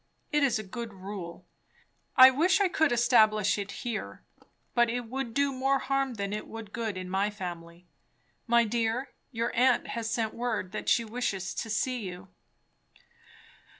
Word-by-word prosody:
It 295 Hz, -, +2 dB
is 260 Hz, -5 st, +3 dB
a 215 Hz, -, -5 dB
good 225 Hz, +1 st, -7 dB
rule. 185 Hz, -3 st, -8 dB, 0.7 s
I 260 Hz, 0 st, +10 dB
wish 330 Hz, +9 st, +3 dB
I 400 Hz, -, +4 dB
could 320 Hz, -5 st, +2 dB
establish 215 Hz, -4 st, +4 dB
it 200 Hz, 0 st, -4 dB
here; 235 Hz, -2 st, -4 dB, 0.5 s
but 240 Hz, -1 st, +3 dB
it 245 Hz, +1 st, -1 dB
would 240 Hz, 0 st, -5 dB
do 280 Hz, -1 st, +2 dB
more 270 Hz, +1 st, +1 dB
harm 270 Hz, -1 st, -1 dB
than 200 Hz, -1 st, -3 dB
it 210 Hz, -, -4 dB
would 225 Hz, -2 st, -9 dB
good 225 Hz, -4 st, -3 dB
in 185 Hz, 0 st, -5 dB
my 195 Hz, +3 st, 0 dB
family. 175 Hz, -3 st, -8 dB, 0.6 s
My 235 Hz, 0 st, +5 dB
dear, 230 Hz, +3 st, -1 dB, 0.2 s
your 230 Hz, 0 st, -2 dB
aunt 250 Hz, +1 st, +3 dB
has 230 Hz, -1 st, -3 dB
sent 220 Hz, -1 st, -1 dB
word 230 Hz, -6 st, -2 dB
that 215 Hz, -, -3 dB
she 235 Hz, -, +3 dB
wishes 210 Hz, -5 st, -3 dB
to 225 Hz, -, -4 dB
see 250 Hz, +4 st, 0 dB
you." 185 Hz, -2 st, -8 dB
230 Hz, 165 wpm, -29 LUFS, 200-250 Hz, 0.7 s, I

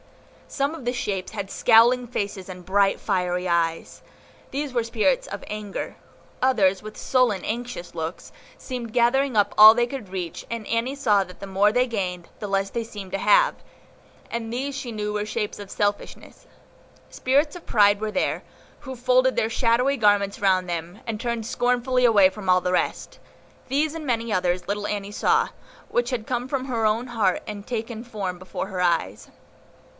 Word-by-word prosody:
Some 280 Hz, +2 st, -1 dB
of 315 Hz, -, -9 dB
the 245 Hz, -, 0 dB
shapes 195 Hz, -7 st, -3 dB
had 200 Hz, -3 st, -5 dB
scowling 240 Hz, +2 st, +5 dB
faces 200 Hz, -5 st, -4 dB
and 180 Hz, -1 st, -9 dB
bright, 195 Hz, +1 st, +2 dB
fiery 180 Hz, -2 st, -1 dB
eyes; 165 Hz, -1 st, -1 dB, 0.5 s
these 280 Hz, -1 st, -3 dB
were 240 Hz, -, +2 dB
the -, -, -6 dB
spirits 235 Hz, +4 st, +1 dB
of 200 Hz, -, -7 dB
Anger. 210 Hz, -2 st, -5 dB, 0.5 s
Others, 205 Hz, -8 st, +3 dB
with 215 Hz, 0 st, -9 dB
sullen, 250 Hz, -7 st, +1 dB
anxious 240 Hz, -5 st, -5 dB
looks, 165 Hz, +1 st, -5 dB, 0.2 s
seemed 245 Hz, -4 st, -6 dB
gathering 250 Hz, +1 st, +2 dB
up 205 Hz, 0 st, +3 dB
all 215 Hz, +1 st, +11 dB
they 240 Hz, +1 st, +2 dB
could 240 Hz, -5 st, -7 dB
reach, 180 Hz, -3 st, -5 dB
and 230 Hz, -2 st, -5 dB
Annie 235 Hz, +4 st, -1 dB
saw 210 Hz, -8 st, +3 dB
that 180 Hz, -1 st, -14 dB
the 195 Hz, -, -7 dB
more 195 Hz, +2 st, +3 dB
they 250 Hz, +3 st, +2 dB
gained, 180 Hz, -6 st, -3 dB
the 210 Hz, -, -4 dB
less 195 Hz, 0 st, 0 dB
they 235 Hz, -, -2 dB
seemed 205 Hz, -4 st, -9 dB
to 195 Hz, -, -1 dB
have; -, -, +4 dB, 0.7 s
and 230 Hz, -1 st, -4 dB
these 270 Hz, +3 st, -3 dB
she 255 Hz, -4 st, -5 dB
knew 210 Hz, -1 st, -3 dB
were 210 Hz, 0 st, -1 dB
shapes 210 Hz, -1 st, -3 dB
of 200 Hz, -1 st, -9 dB
Selfishness. 205 Hz, -1 st, -3 dB, 0.6 s
Spirits 285 Hz, +4 st, +1 dB
of 350 Hz, -, -11 dB
Pride 205 Hz, -1 st, +4 dB
were 215 Hz, -1 st, -2 dB
there, 275 Hz, -, -1 dB, 0.4 s
who 265 Hz, -3 st, -7 dB
folded 255 Hz, +1 st, +3 dB
their 220 Hz, -, +1 dB
shadowy 250 Hz, +3 st, +2 dB
garments 205 Hz, -3 st, +2 dB
round 185 Hz, -2 st, +2 dB
them, 175 Hz, +3 st, -5 dB
and 220 Hz, -1 st, -3 dB
turned 235 Hz, -2 st, -2 dB
scornfully 250 Hz, +2 st, +1 dB
away 205 Hz, -5 st, +6 dB
from 195 Hz, -1 st, -7 dB
all 180 Hz, 0 st, +6 dB
the 180 Hz, 0 st, -2 dB
rest. 180 Hz, -, -2 dB, 0.5 s
These 295 Hz, +3 st, +1 dB
and 325 Hz, -2 st, -6 dB
many 230 Hz, -3 st, -1 dB
others 180 Hz, -1 st, 0 dB
little 205 Hz, 0 st, -2 dB
Annie 205 Hz, -1 st, -3 dB
saw, -, -, +2 dB, 0.4 s
which 240 Hz, 0 st, 0 dB
had 240 Hz, -4 st, -3 dB
come 245 Hz, 0 st, -2 dB
from 265 Hz, -1 st, -2 dB
her 235 Hz, -4 st, -1 dB
own 225 Hz, +4 st, 0 dB
heart, 215 Hz, -6 st, 0 dB
and 205 Hz, -1 st, -7 dB
taken 230 Hz, -1 st, -4 dB
form 200 Hz, -7 st, -5 dB
before 185 Hz, +1 st, -5 dB
her 190 Hz, -2 st, -4 dB
eyes. 110 Hz, -, 0 dB
215 Hz, 180 wpm, -24 LUFS, 195-245 Hz, 0.7 s, all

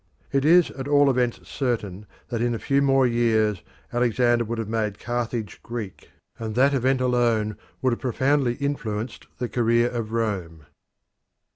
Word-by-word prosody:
It 140 Hz, 0 st, +1 dB
is 175 Hz, +2 st, +5 dB
at 135 Hz, 0 st, -6 dB
all 145 Hz, -1 st, +5 dB
events 125 Hz, -2 st, 0 dB
certain 105 Hz, -7 st, -3 dB, 0.2 s
that 115 Hz, -2 st, -2 dB
in 120 Hz, 0 st, +1 dB
a -, -, -2 dB
few 140 Hz, +4 st, +1 dB
more 135 Hz, -1 st, +4 dB
years 110 Hz, -5 st, +2 dB, 0.3 s
Alexander 120 Hz, 0 st, +2 dB
would 115 Hz, +1 st, -4 dB
have 115 Hz, -2 st, -3 dB
made 110 Hz, -2 st, -1 dB
Carthage 120 Hz, -3 st, -3 dB
Greek, 115 Hz, -5 st, -7 dB, 0.3 s
and 110 Hz, -2 st, -4 dB
that 135 Hz, +3 st, +4 dB
event 130 Hz, 0 st, +1 dB
alone 120 Hz, -4 st, +1 dB, 0.3 s
would 130 Hz, -2 st, +3 dB
have -, -, -4 dB
profoundly 130 Hz, 0 st, +1 dB
influenced 120 Hz, -5 st, -4 dB
the 125 Hz, -, -2 dB
career 120 Hz, 0 st, +2 dB
of 115 Hz, -3 st, -4 dB
Rome. 95 Hz, -9 st, -3 dB
120 Hz, 155 wpm, -24 LUFS, 110-130 Hz, 0.3 s, is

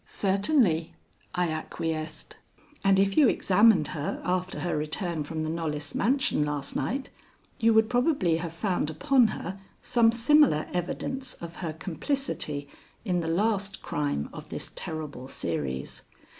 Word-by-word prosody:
"Certainly," 195 Hz, -, +1 dB, 0.4 s
I 180 Hz, -1 st, +1 dB
acquiesced, 155 Hz, 0 st, -4 dB, 0.5 s
"and 195 Hz, -1 st, +5 dB
if 195 Hz, 0 st, +2 dB
you 285 Hz, -6 st, +6 dB
examined 195 Hz, -5 st, +4 dB
her 145 Hz, 0 st, -3 dB
after 185 Hz, 0 st, -1 dB
her 175 Hz, -, -1 dB
return 160 Hz, +2 st, -2 dB
from 155 Hz, +1 st, -4 dB
the 155 Hz, -, -2 dB
Knollys 150 Hz, -3 st, -3 dB
mansion 260 Hz, -, +2 dB
last 145 Hz, -2 st, -3 dB
night 270 Hz, +5 st, -2 dB, 0.5 s
you 230 Hz, 0 st, +4 dB
would 220 Hz, 0 st, +5 dB
probably 245 Hz, -, +2 dB
have 165 Hz, 0 st, -4 dB
found 175 Hz, -2 st, -1 dB
upon 255 Hz, -, +4 dB
her 190 Hz, -2 st, -5 dB, 0.2 s
some 230 Hz, -2 st, +4 dB
similar 235 Hz, -, +4 dB
evidence 255 Hz, +9 st, -3 dB
of 170 Hz, 0 st, -9 dB
her 170 Hz, -4 st, -3 dB
complicity 160 Hz, -, -3 dB, 0.4 s
in 180 Hz, -4 st, +1 dB
the 165 Hz, -, -3 dB
last 200 Hz, +2 st, 0 dB
crime 145 Hz, -, -1 dB
of -, -, -9 dB
this -, -, -6 dB
terrible 150 Hz, -5 st, -5 dB
series. 70 Hz, -, -3 dB
175 Hz, 140 wpm, -28 LUFS, 155-225 Hz, 0.5 s, you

